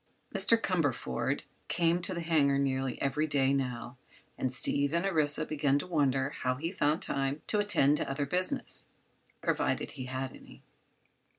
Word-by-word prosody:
Mr. 230 - +4
Cumberford 145 - -1 0.2
came 170 0 +1
to 185 +1 -3
the 170 - -3
hangar 150 -4 +3
nearly 135 -2 -1
every 145 +3 0
day, 140 -2 +3
now, 125 -2 -3 0.4
and 130 - -2
Steve 140 +3 +2
and 170 +3 +1
Orissa 155 -4 +1
began 145 -2 +1
to 145 - -3
wonder 140 -5 +1
how 130 -3 -1
he 165 +6 -3
found 155 -4 +1
time 135 +2 -2
to 210 - 0
attend 150 -8 +3
to - - -3
other 140 +1 -1
business—provided 180 +6 -3
he 130 - -7
had 130 +1 -4
any. - - -15
145 Hz, 155 wpm, -31 LUFS, 135-165 Hz, 0.4 s, Mr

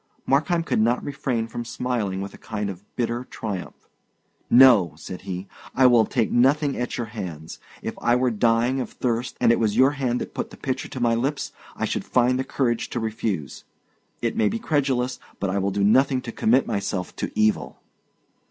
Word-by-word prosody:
Markheim 165 +5 +2
could - - 0
not 115 +3 +2
refrain 130 -5 -2
from 120 +1 -5
smiling 115 -6 -2
with 100 0 -6
a - - -12
kind 105 -2 -3
of 95 +1 -11
bitter 120 0 -1
triumph. 100 -7 -6 0.6
"No," 120 - +7
said 90 +4 -8
he, 90 +1 -4 0.3
"I 130 - +5
will 120 -3 +6
take 120 -5 0
nothing 140 +4 +3
at 125 +2 -3
your 120 - -2
hands; 85 -7 -7 0.2
if - - -3
I 120 - +3
were 125 0 +2
dying 115 +4 +2
of 130 - -3
thirst, 120 0 -2
and - - +5
it 115 - +2
was 110 -1 +1
your 130 +2 +6
hand 130 -4 -1
that - - -6
put - - -3
the - - -13
pitcher 130 -2 -3
to 130 - -7
my 120 -1 +2
lips, 135 +6 -1 0.2
I - - -1
should - - -2
find 125 +1 +2
the - - +1
courage 120 -3 -1
to 120 - -3
refuse. 110 - -3 0.6
It 115 - 0
may 105 - +3
be 115 - -2
credulous, 130 -3 0 0.2
but 100 -1 -1
I 100 - 0
will 100 +1 0
do 100 +1 -1
nothing 130 +5 +4
to 115 - -5
commit 120 +4 +3
myself 100 -2 -3
to - - -3
evil." 110 0 +1
120 Hz, 200 wpm, -24 LUFS, 105-130 Hz, 0.6 s, No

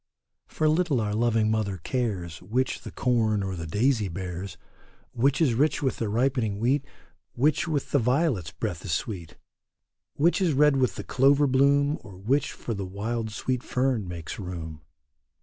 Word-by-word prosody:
For 155 - 0
little 155 -4 +2
our 105 -2 -1
loving 110 -1 +2
mother 105 -3 -1
cares 90 -5 -3
Which 125 +4 -1
the - - -8
corn 110 -5 +1
or 95 -1 -3
the 80 -1 -6
daisy 110 - +1
bears, 90 +1 -6 0.5
Which 135 +3 +2
is 145 -7 +3
rich 145 +5 +1
with 130 - 0
the 115 - -2
ripening 120 -2 0
wheat. 130 +6 +1 0.5
Which 150 +6 +2
with 150 -4 -2
the 140 - +4
violet's 125 - +1
breath 90 0 -4
is 90 - -2
sweet, 90 -6 -4 0.8
Which 170 +6 +2
is 175 -5 +2
red 145 0 +4
with 130 -2 +1
the - - -5
clover 140 +2 +4
bloom, 140 +2 +3
Or 100 -3 -12
which 125 +10 0
for 115 - -5
the 100 -2 -4
wild 110 +4 -3
sweet 125 +3 -2
fern 125 -6 0
makes 85 +1 -6
room. 80 -5 -6
115 Hz, 165 wpm, -26 LUFS, 100-135 Hz, 0.8 s, the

